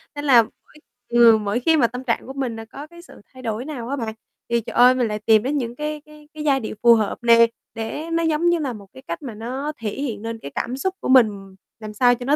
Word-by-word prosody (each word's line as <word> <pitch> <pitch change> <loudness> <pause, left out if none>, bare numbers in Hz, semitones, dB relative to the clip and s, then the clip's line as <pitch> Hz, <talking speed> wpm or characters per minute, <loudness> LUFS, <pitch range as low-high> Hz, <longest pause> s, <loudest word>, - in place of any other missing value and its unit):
Nên 290 0 -5
là 245 -5 +6
mỗi, - - -14 0.6
ừm, 235 -2 +5
mỗi 205 +4 0
khi 320 +6 +3
mà 240 -6 +4
tâm 250 +2 -7
trạng 235 -1 -2
của 265 - -7
mình 260 -4 -3
là 225 - -8
có 280 +6 -10
cái 340 +1 -15
sự 345 - -16
thay 260 0 -13
đổi 225 +1 -3
nào 260 -6 -6
á 280 - -1
bạn, 225 -5 -4 0.4
thì, 235 0 +1
trời - - -8
ơi, 250 +1 +6
mình 250 -2 +1
lại 210 0 -3
tìm 215 0 +3
đến 280 +4 -1
những 240 -3 -3
cái 300 +1 -4
cái 300 -1 -17
cái 310 -1 -7
giai 280 -3 +2
điệu 220 - -6
phù 235 0 +8
hợp 215 -3 -1
nề, 230 0 +7 0.3
để 260 +8 -5
nó 335 0 +1
giống 325 +1 +2
như 345 -1 +2
là 275 -5 -3
một 205 -3 -12
cái 260 - -13
cách 335 - -5
mà 260 -6 -7
nó 255 +7 -4
thể 225 -2 -3
hiện 230 -3 -4
nên 225 0 -5
cái 140 - -9
cảm 255 - -3
xúc 380 +7 -2
của - - -4
mình 205 -7 +3 0.2
làm 215 -1 -8
sao 245 +3 +4
cho 245 +1 -8
nó 285 +3 +3
245 Hz, 280 wpm, -22 LUFS, 225-290 Hz, 0.6 s, phù